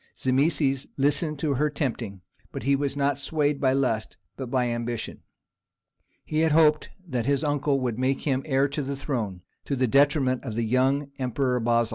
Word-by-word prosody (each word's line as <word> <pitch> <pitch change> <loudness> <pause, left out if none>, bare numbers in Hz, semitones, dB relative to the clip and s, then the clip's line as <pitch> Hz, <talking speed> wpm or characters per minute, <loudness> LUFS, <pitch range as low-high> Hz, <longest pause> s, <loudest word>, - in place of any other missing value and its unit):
Zimisces 135 0 +1
listened 150 +2 +1
to 145 0 0
her 150 +3 +1
tempting, 120 - -3 0.3
but - - -6
he 140 +1 +3
was 140 0 -2
not 140 -1 +1
swayed 145 -1 0
by 130 -2 +3
lust, 120 -5 -1 0.2
but 130 -3 -6
by 125 -1 +1
ambition: 120 -1 -4 1.0
he 155 - -1
had 160 -1 +3
hoped 155 -1 +4 0.2
that 125 -6 -2
his 140 +1 +2
uncle 145 -1 +1
would 125 -3 -2
make 130 +1 +1
him 135 -3 0
heir 135 -1 +3
to 145 +2 -3
the 140 0 -4
throne, 110 -11 -3 0.2
to 140 - -1
the 130 0 +2
detriment 135 0 +3
of 115 -6 -5
the 115 0 0
young 135 +4 +1
emperor 125 0 0
Basil. 115 0 +2
135 Hz, 180 wpm, -26 LUFS, 125-145 Hz, 1.0 s, hoped